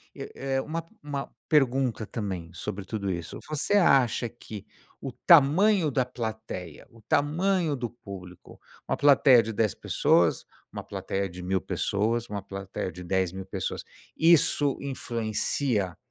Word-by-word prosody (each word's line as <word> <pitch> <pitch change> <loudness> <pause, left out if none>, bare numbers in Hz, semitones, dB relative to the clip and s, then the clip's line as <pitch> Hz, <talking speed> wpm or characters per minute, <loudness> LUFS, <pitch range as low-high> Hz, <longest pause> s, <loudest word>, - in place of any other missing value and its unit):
eh - - -7
eh 135 0 -1
uma 165 +4 -4 0.2
uma 145 -2 -4 0.2
pergunta 130 -5 +2
também 95 -7 -5
sobre 100 +1 -5
tudo 100 -2 -3
isso. 85 -2 -5
Você 155 +6 -1
acha 130 - +4
que 110 -4 -10 0.4
o 135 - -5
tamanho 170 - +5
da 130 -1 +1
plateia, 110 -9 -6
o 115 -1 -18
tamanho 160 - +1
do 120 -3 -4
público, 95 -6 -12 0.3
uma - - 0
plateia 140 -3 +6
de 115 0 -5
10 105 -2 +1
pessoas, 85 -1 +2 0.3
uma - - -6
plateia 100 0 -3
de 90 +1 -9
1.000 95 +1 0
pessoas, 115 +3 -1
uma 100 -1 -4
plateia 100 -1 -5
de 90 +2 -10
10.000 95 +1 -1
pessoas, - - -4 0.3
Isso 155 -4 +4
influencia 115 - -1
115 Hz, 140 wpm, -27 LUFS, 95-140 Hz, 0.4 s, plateia